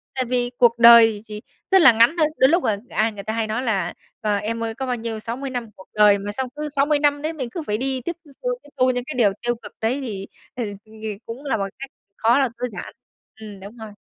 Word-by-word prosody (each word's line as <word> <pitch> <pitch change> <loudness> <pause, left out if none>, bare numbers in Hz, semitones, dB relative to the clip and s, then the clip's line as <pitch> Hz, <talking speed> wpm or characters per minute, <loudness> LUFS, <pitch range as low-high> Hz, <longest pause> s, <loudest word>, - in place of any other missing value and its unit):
Tại 255 - 0
vì 245 0 -1
cuộc 235 -1 +4
đời 230 -3 +8
chỉ 210 -1 -8 0.3
rất 380 -2 +6
là 265 - +9
ngắn 230 +8 +4
thôi. 310 - +4
Đôi 260 - +5
lúc, 345 +2 +2
ờ, 210 -2 +1
ai 220 +1 +1
người 200 -2 -9
ta 220 - -3
hay 225 -1 -1
nói 220 +4 -2
là: 220 -5 -1 0.3
"Ờ, 210 -1 +1
em 230 +3 -3
ơi 225 0 -4
có 265 +1 -4
bao 250 -1 -1
nhiêu, 225 -1 -5
60 245 +5 -5
năm 245 -3 -5
cuộc 190 - -15
đời." 210 -1 +5
Mà 205 +1 -5
xong 260 +3 -4
cứ 300 0 -4
60 290 +1 +1
năm 290 0 +2
đấy 315 +2 -2
mình 260 -6 -5
cứ 325 - -5
phải 210 0 0
đi 260 0 -2
tiếp 340 +6 -4 0.3
thu, - - 0
tiếp 290 - -17
thu 255 0 +3
những 245 -1 -2
cái 305 - -5
điều 210 -5 +4
tiêu 240 0 -1
cực 230 - -13
đấy 250 +5 0
thì, 200 -6 -6 0.3
ừ, 245 - -3 0.2
ờ, 215 - -21 0.3
cũng 250 +6 -8
là 230 -5 0
một 195 -1 -2
cái 275 - -7 0.3
khó 230 +4 +3
là 265 -3 +2
tối 250 +1 -2
giản. 180 - -8 0.5
Ừm, 205 -3 -9
đúng 205 +5 -11
rồi. 220 -1 -9
235 Hz, 265 wpm, -22 LUFS, 220-265 Hz, 0.5 s, là